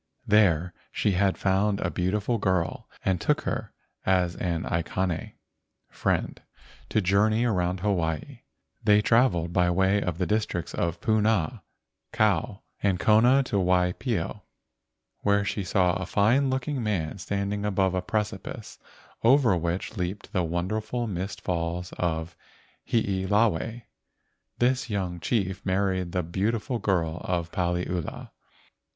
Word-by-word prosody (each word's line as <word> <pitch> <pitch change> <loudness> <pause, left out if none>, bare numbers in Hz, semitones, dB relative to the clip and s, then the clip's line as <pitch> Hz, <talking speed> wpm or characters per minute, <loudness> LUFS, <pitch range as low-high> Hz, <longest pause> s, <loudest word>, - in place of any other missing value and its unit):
There 90 -5 +3 0.2
she 105 - +1
had 95 +1 +2
found 100 +1 +1
a 90 - -1
beautiful 100 +8 0
girl 95 +6 -1 0.2
and 95 -3 +1
took - - +2
her - - -3 0.3
as 90 -2 +2
an 85 -2 -2
aikane 85 0 -2 0.6
(friend) - - -1 0.5
to 110 - +2
journey 105 +5 +3
around 90 -5 0
Hawaii. 85 -6 -1 0.4
They 105 0 +5
travelled 105 -9 +3
by 90 -1 +3
way 95 +3 +2
of 90 -4 -2
the 90 - 0
districts 105 -6 -1
of 85 0 -1
Puna, 110 -6 +1 0.5
Kau, - - +1 0.2
and 95 -3 +1
Kona 120 +7 +5
to 105 - -2
Waipio, 90 +3 0 0.8
where 100 0 +2
she 100 - -2
saw 90 -1 +2
a 95 -2 -3
fine 120 +9 +3
looking 130 +1 -1
man 100 -5 -2
standing 100 +2 -2
above 95 -2 +1
a 90 - 0
precipice 105 0 -4 0.4
over 120 -4 +5
which 85 +5 -3
leaped 95 +4 -4
the 90 -4 +1
wonderful 105 +8 -2
mist 95 -2 -4
falls 85 +1 -2
of 85 -1 -2 0.5
Hiilawe. 105 +1 +1 0.7
This 125 +1 +1
young 95 -4 -2
chief 95 0 -1
married 95 -2 0
the 90 0 -1
beautiful 105 +8 -1
girl 85 -5 0
friend - - -9
of 85 0 -8
Paliula. 90 -1 -2
95 Hz, 130 wpm, -27 LUFS, 90-105 Hz, 0.8 s, They